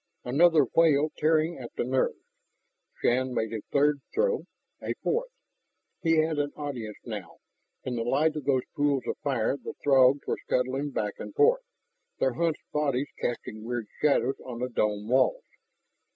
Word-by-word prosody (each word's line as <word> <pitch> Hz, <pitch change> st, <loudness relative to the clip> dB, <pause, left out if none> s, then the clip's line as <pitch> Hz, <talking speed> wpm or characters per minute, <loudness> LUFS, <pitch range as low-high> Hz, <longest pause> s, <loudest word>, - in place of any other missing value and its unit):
Another 155 Hz, +3 st, +4 dB
wail 155 Hz, -2 st, +4 dB
tearing 160 Hz, +1 st, +2 dB
at 120 Hz, -, -7 dB
the -, -, -1 dB
nerves. 130 Hz, +2 st, 0 dB, 0.9 s
Shann 130 Hz, +1 st, +2 dB
made 110 Hz, 0 st, -1 dB
a 110 Hz, -, -3 dB
third 145 Hz, 0 st, +3 dB
throw, 475 Hz, +1 st, +1 dB, 0.4 s
a -, -, -3 dB
fourth. 485 Hz, +2 st, 0 dB, 0.7 s
He 165 Hz, -2 st, +3 dB
had 155 Hz, -1 st, +2 dB
an 145 Hz, 0 st, 0 dB
audience 125 Hz, -8 st, -5 dB
now. 105 Hz, -7 st, -7 dB, 0.5 s
In 125 Hz, -2 st, -3 dB
the -, -, -1 dB
light 155 Hz, +6 st, +2 dB
of 150 Hz, -3 st, -5 dB
those 130 Hz, -3 st, +2 dB
pools 145 Hz, -2 st, +1 dB
of -, -, -3 dB
fire 135 Hz, -3 st, 0 dB
the -, -, -8 dB
Throgs 135 Hz, 0 st, +5 dB
were -, -, -2 dB
scuttling 130 Hz, +3 st, 0 dB
back 105 Hz, -6 st, -2 dB
and -, -, -8 dB
forth, 485 Hz, +3 st, +4 dB, 0.6 s
their 130 Hz, -, +1 dB
hunched 165 Hz, +4 st, -1 dB
bodies 145 Hz, -2 st, 0 dB
casting 110 Hz, -2 st, -4 dB
weird 120 Hz, -1 st, -3 dB, 0.2 s
shadows 135 Hz, -3 st, +2 dB
on 125 Hz, -2 st, -7 dB
the 125 Hz, -, -1 dB
dome 105 Hz, -3 st, -1 dB
walls. 135 Hz, -, +2 dB
140 Hz, 160 wpm, -28 LUFS, 125-155 Hz, 0.9 s, Throgs